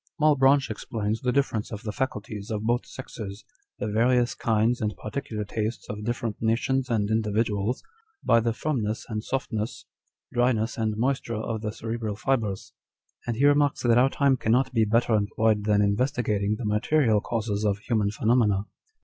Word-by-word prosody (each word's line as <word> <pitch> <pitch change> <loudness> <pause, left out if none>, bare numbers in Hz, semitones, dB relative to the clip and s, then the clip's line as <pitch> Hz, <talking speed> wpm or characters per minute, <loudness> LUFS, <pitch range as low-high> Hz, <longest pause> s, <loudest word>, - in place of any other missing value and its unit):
" - - -49
Malebranche 140 -3 +4
explains 110 +1 -3
the 125 -2 +1
difference 125 -6 0
of 105 0 -6
the 110 - -3
faculties 110 -5 -4
of 105 -1 -2
both 120 +3 0
sexes, 105 -5 -8 0.3
the - - -3
various 120 +3 +2
kinds 115 +2 +1
and 105 -1 -2
particular 110 -2 -4
tastes 110 +2 -3
of 105 0 -6
different 120 -1 -2
nations 125 +4 +1
and 110 -3 0
individuals, 110 +1 0 0.4
by 115 - +5
the 115 0 0
firmness 115 -4 -2
and 110 -1 -3
softness, 115 -4 -3 0.5
dryness 120 -2 +1
and 110 -2 -1
moisture 125 -1 -1
of 110 0 -3
the 105 -1 -2
cerebral 110 -1 -4
fibres; 110 -5 -1 0.5
and 120 - -1
he 135 +5 +2
remarks 145 0 +3
that 120 -1 +5
our 130 +2 +5
time 140 -1 +2
cannot 125 +3 +1
be 115 -2 +3
"better 115 +2 +2
employed 105 0 +1
than 105 -1 +3
in 100 - +3
investigating 105 -3 0
the 120 - -5
material 110 +1 +2
causes 110 -3 -2
of 100 -2 +1
human 105 -1 0
phenomena. 105 -2 +2
115 Hz, 165 wpm, -26 LUFS, 105-125 Hz, 0.5 s, by